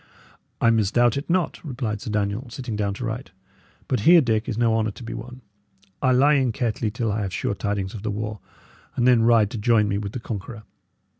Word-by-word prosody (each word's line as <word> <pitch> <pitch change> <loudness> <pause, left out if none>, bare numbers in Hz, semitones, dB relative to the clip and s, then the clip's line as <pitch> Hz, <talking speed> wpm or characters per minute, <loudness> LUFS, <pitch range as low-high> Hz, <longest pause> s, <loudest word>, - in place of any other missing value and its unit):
"I 115 - +4
misdoubt 115 +2 +3
it 140 +4 -4
not," 180 0 0
replied 120 -8 -4
Sir 125 - -6
Daniel, 105 +4 -2
sitting 120 -2 -5
down 100 -1 -1
to 120 - -5
write. 115 +3 -4 0.6
"But 130 - 0
here, 170 +11 +7
Dick, 115 -6 0
is 115 - -3
no 115 -1 +2
honour 110 -1 +1
to 105 - -10
be 115 - -6
won. 125 +3 -8 0.6
I 130 - +3
lie 135 +4 +5
in 130 -4 +2
Kettley 115 -2 -1
till 115 -1 -2
I 105 +1 -1
have 95 -2 -3
sure 100 - -2
tidings 100 -2 -3
of 110 - -7
the 110 - -3
war, 105 0 -4 0.6
and 120 - +2
then 125 -2 +5
ride 115 -3 +4
to 115 - -4
join 105 -1 +3
me 100 0 -1
with 100 -1 -5
the - - -4
conqueror. 110 0 -7
115 Hz, 220 wpm, -24 LUFS, 105-125 Hz, 0.6 s, here